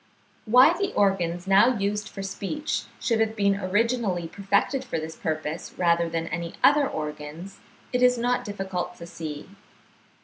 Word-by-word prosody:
Why 255 +9 +6
the 395 +2 -1
organs 180 -3 +1
now 205 +6 +5
used 205 +1 -2
for 195 - -7
speech 250 +10 -3
should 230 -2 0
have 220 0 +1
been 200 -2 +2
originally 205 -2 0
perfected 200 +8 0
for 205 -10 -3
this 160 +1 -6
purpose, 155 0 -4
rather 170 -1 +2
than 165 0 -2
any 170 +1 -4
other 290 -2 +5
organs, 150 +4 -6 0.3
it 250 - +1
is 250 0 +5
not 245 +1 0
difficult 195 -3 -4
to 170 - -10
see. 155 -3 -7
195 Hz, 150 wpm, -25 LUFS, 170-230 Hz, 0.3 s, Why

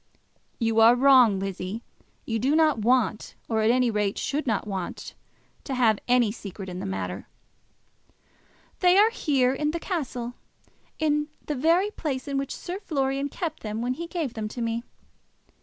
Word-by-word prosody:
"You 225 -1 +1
are 230 +2 +7
wrong, 250 -5 +6
Lizzie. 195 +3 -4 0.4
You 225 -1 -1
do 270 +6 +2
not 310 -6 +3
want, 230 -1 +1
or 220 -1 0
at 215 - +3
any 245 0 +3
rate 210 -2 -1
should 290 +1 -2
not 220 -4 0
want, 190 -4 -5 0.5
to 270 - -3
have 225 -4 +3
any 245 -3 +3
secret 195 -3 -8
in 180 0 -6
the - - -4
matter." 95 0 -4 1.5
"They 360 0 +5
are 430 +3 +6
here, 270 - +1
in 300 +2 -1
the 335 +2 -2
castle; 255 - -4 0.6
in 300 -1 +1 0.2
the 300 - -2
very 335 +9 +2
place 280 -8 -4
in 275 -1 -1
which 275 - -4
Sir 365 +2 -6
Florian 275 -6 -1
kept 320 0 -4
them 215 +1 -4
when 250 +1 0
he 335 +6 -6
gave 325 -8 -3
them 220 -2 -4
to 230 - -8
me. 230 0 -1
250 Hz, 170 wpm, -26 LUFS, 220-300 Hz, 1.5 s, are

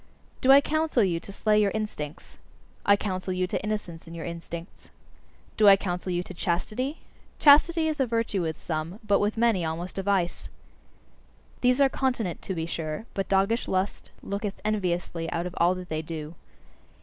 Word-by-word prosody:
Do 260 - +6
I 275 +1 +9
counsel 310 -5 +1
you 175 -4 +1
to 200 - -11
slay 210 +1 +2
your 205 - +3
instincts? 165 -9 -5 0.5
I 200 - +7
counsel 185 -2 -3
you 185 0 0
to 180 - -3
innocence 200 -6 -4
in 165 - -9
your 165 - -6
instincts. 170 +1 -8 0.7
Do 215 - +5
I 200 - +10
counsel 180 -1 -3
you 175 0 0
to 185 - -9
chastity? 215 - -2 0.4
Chastity 315 +3 +6
is 310 -2 -2
a 265 - +2
virtue 230 -4 0
with 160 -2 -3
some, 160 +4 -4
but 205 -1 +3
with 210 +2 0
many 225 -6 +3
almost 165 +4 -4
a - - 0
vice. 190 -3 -1 1.1
These 250 +1 +3
are 275 - +6
continent, 250 -9 -1
to 190 - -4
be 160 -1 -2
sure: 160 +2 -4
but 195 - -3
doggish 195 +5 +2
lust 190 +2 -2
looketh 200 0 -4
enviously 175 -5 -1
out 170 +1 -2
of 180 - -5
all 175 +2 +4
that 180 0 -8
they 155 0 -2
do. 155 -1 -6
195 Hz, 180 wpm, -27 LUFS, 170-220 Hz, 1.1 s, I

